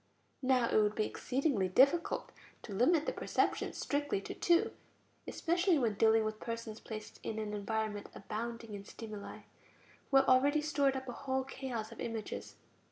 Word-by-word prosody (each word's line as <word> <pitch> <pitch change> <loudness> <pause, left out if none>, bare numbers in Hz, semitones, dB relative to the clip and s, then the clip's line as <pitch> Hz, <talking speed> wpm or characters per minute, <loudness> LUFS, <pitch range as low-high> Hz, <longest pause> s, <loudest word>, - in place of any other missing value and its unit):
Now 255 -2 +3
it 215 - +4
would 210 0 +1
be 215 - +1
exceedingly 255 - 0
difficult 280 - +3 0.3
to 205 - -7
limit 295 - +3
the - - -1
perceptions - - 0
strictly 290 -6 0
to - - -6
two, 345 0 +3 0.6
especially 350 +1 +2
when 235 -6 +1
dealing 220 +1 +4
with 215 0 -3
persons 230 -1 -5
placed 215 -1 -8
in 220 - -4
an 215 -1 -3
environment 210 0 -2
abounding 230 +2 -5
in 200 -1 -6
stimuli, 215 -1 -8 0.7
who 275 - +5
have 270 - +5
already 280 +4 +5
stored 285 -3 +2
up 265 0 -4
a - - -3
whole 265 +1 -2
chaos 255 -4 -5
of 230 - -11
images. 225 -2 -5
230 Hz, 165 wpm, -34 LUFS, 215-270 Hz, 0.7 s, who